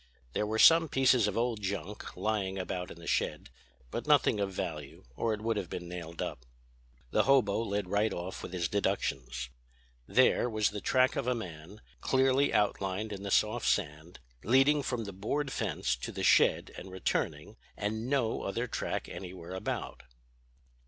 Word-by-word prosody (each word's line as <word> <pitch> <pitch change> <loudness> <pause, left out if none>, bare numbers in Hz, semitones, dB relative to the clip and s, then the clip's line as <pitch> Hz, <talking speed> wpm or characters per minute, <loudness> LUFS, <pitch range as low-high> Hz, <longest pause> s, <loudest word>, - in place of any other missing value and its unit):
There 105 - 0
were 110 +1 -1
some 165 +6 +7
pieces 130 -5 +4
of 105 - -2
old 115 -2 0
junk 100 0 -5
lying 100 -3 -1
about 90 -1 -3
in - - -10
the 85 - -12
shed; - - -1 0.4
but - - -4
nothing 105 - +4
of 100 -1 -1
value 80 -5 -5
or 115 - 0
it 105 -1 -2
would 115 0 0
have 95 -4 -3
been 90 -1 -5
nailed 85 -1 -6
up. - - -6 0.7
"The - - +3
hobo 125 -7 +4
led 100 -3 -2
right 105 +3 +1
off 90 +2 -5
with - - -7
his 90 -3 -1
deductions. 65 -11 -2 0.6
There, 125 - +4
was 110 -2 +1
the 105 -1 -5
track 130 +4 +3
of 135 - -2
a 125 - +2
man, 90 -1 -8 0.2
clearly 135 +1 +3
outlined 105 0 0
in 100 - -7
the 100 - -4
soft 110 +4 +2
sand, 80 -2 -1 0.2
leading 135 +6 +4
from 125 -3 -2
the 100 -2 -7
board 135 +9 -2
fence 60 - -1
to - - -5
the - - -5
shed - - +4
and 95 - -9
returning, 95 -1 -2 0.2
and 110 +4 -2
no 130 -5 +1
other 115 +5 -2
track 125 - -3
anywhere 90 -1 -8
about. 95 - -4
105 Hz, 170 wpm, -31 LUFS, 90-115 Hz, 0.7 s, some